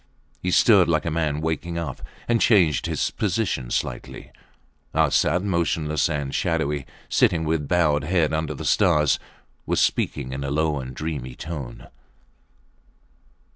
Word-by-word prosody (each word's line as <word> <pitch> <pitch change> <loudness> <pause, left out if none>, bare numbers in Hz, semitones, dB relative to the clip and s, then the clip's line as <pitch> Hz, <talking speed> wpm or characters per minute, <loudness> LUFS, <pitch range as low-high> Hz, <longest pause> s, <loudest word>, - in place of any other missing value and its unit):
He 90 - -1
stirred 95 -1 +5
like 80 -2 +1
a 85 - -1
man 75 -2 -1
waking 80 +2 -2
up 80 -6 -5 0.3
and 120 -1 +2
changed 90 -10 +3
his - - -1
position 95 - -1
slightly. - - -4 0.6
Arsat, 90 +2 +2
motionless 85 -4 0
and 70 -3 -3
shadowy, 75 -4 -1 0.2
sitting 80 -2 +2
with 75 -2 -1
bowed 75 -3 +2
head 85 -2 +1
under 80 -1 -2
the - - -7
stars, 75 -2 +3 0.5
was - - +1
speaking 65 -2 0
in 70 +1 -4
a 70 - -3
low 75 0 0
and 65 0 -7
dreamy 70 -5 -5
tone 70 -7 -7
80 Hz, 135 wpm, -23 LUFS, 70-85 Hz, 0.6 s, stirred